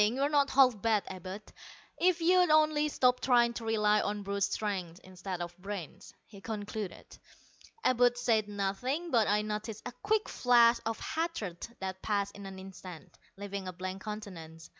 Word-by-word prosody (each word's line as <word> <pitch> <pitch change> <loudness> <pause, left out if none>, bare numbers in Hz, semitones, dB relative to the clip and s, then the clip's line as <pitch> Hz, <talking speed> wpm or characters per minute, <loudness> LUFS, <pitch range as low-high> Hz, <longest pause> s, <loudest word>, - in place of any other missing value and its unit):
You're 270 +5 0
not 285 -2 +3
half 255 -6 +4
bad, 220 -3 +2
Abud, 190 +2 -7 0.6
if 355 -1 +3
you'd 360 +1 +4
only 305 -1 +4
stop 250 -3 +3
trying 240 -2 +3
to 235 - -6
rely 210 -1 +2
on 205 0 -3
brute 200 0 -3
strength 190 -4 -2
instead 185 -1 -6
of 175 0 -8
brains," 195 -2 -7
he 200 -2 -14
concluded. 210 -3 -6 0.6
Abud 245 -1 +3
said 225 -3 +2
nothing, 210 - -2
but 230 -4 +3
I 210 +1 +2
noticed 215 0 -5
a 245 - -4
quick 435 0 +1
flash 240 -1 +4
of 225 - -2
hatred 315 - -3
that 190 0 -4
passed 200 -2 -1
in 200 -1 -8
an 190 0 -9
instant, 185 -3 -11 0.2
leaving 200 -1 -5
a 185 - -5
blank 185 +2 -6
countenance. 170 -7 -8
210 Hz, 160 wpm, -31 LUFS, 195-245 Hz, 0.6 s, half